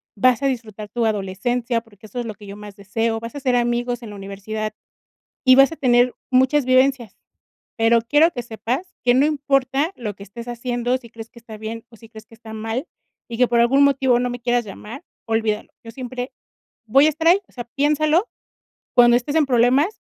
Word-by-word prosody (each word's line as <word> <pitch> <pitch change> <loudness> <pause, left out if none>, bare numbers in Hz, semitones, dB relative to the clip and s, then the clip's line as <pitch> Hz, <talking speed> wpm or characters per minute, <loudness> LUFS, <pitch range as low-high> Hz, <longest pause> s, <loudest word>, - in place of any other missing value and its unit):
vas 250 +4 +3
a - - +3
disfrutar 220 -5 -5
tu 235 +1 -1
adolescencia, 225 +4 -1
porque 220 -2 -19
eso 230 +4 -6
es 240 - -3
lo 220 - -5
que 205 - -14
yo 200 - -8
más 210 -1 -11
deseo, 225 +3 -2
vas 230 +4 -8
a - - -4
hacer 255 -2 +1
amigos 240 0 -1
en 220 - -8
la - - -9
universidad 205 +2 -5 0.7
y 255 0 +8
vas 275 +3 +6
a - - -6
tener 245 -1 +3 0.2
muchas 260 +2 +3
vivencias, 255 -4 +2 0.6
pero 230 0 +4
quiero 295 +8 +3
que 245 - -5
sepas 235 - -4
que 245 - +4
no 270 +3 +4
importa 280 0 0
lo 215 -5 -5
que 200 - -11
estés 230 +4 -10
haciendo, 245 +1 -2
si 240 -3 -15
crees 225 0 -10
que 240 - -16
está 225 -2 -11
bien, 220 +1 -7
o 230 - -17
si 225 0 -16
crees 220 -1 -13
que - - -20
está 225 -1 -12
mal, 225 +6 -4 0.4
y 230 - -5
que 250 0 +4
por 235 0 +2
algún 265 +4 +4
motivo 265 -3 +3
no 250 0 -1
me 245 - -6
quieras 240 -1 0
llamar, 215 - -9 0.2
olvídalo, 225 -2 -1
yo 230 - -9
siempre 250 +1 -6 0.6
voy 270 +7 +5
a - - +5
estar 315 +2 -2
ahí, 365 +3 +5
o - - -27
sea, 245 - -7
piénsalo 300 - +1 0.7
cuando 240 -1 +6
estés 250 +4 -2
en 310 -2 +3
problemas 260 - +2
240 Hz, 210 wpm, -21 LUFS, 225-260 Hz, 0.7 s, y